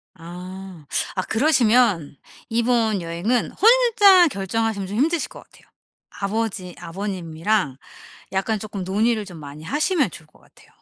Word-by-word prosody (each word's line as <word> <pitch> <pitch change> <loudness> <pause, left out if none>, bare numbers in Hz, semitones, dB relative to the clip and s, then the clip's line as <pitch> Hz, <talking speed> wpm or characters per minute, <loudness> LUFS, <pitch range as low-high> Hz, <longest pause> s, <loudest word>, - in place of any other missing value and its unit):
아. 180 -1 -10 0.3
아 185 - 0
그러시면 230 - +2 0.3
이번 230 -3 +1
여행은 175 +9 -1
혼자 420 -6 +6
결정하시면 200 -2 -2
좀 205 - -5
힘드실 320 +5 +1
것 - - -12
같아요. - - -23 0.4
아버지 195 -3 -3
아버님이랑 175 -3 -2 0.6
약간 210 +3 0
쪼끔 200 -3 -6
논의를 215 +3 +1
좀 175 -4 -10
많이 145 +1 -10
하시면 295 - +1
좋을 160 -1 -12
것 - - -25
같아요. - - -23
205 Hz, 295 characters per minute, -22 LUFS, 180-235 Hz, 0.6 s, 혼자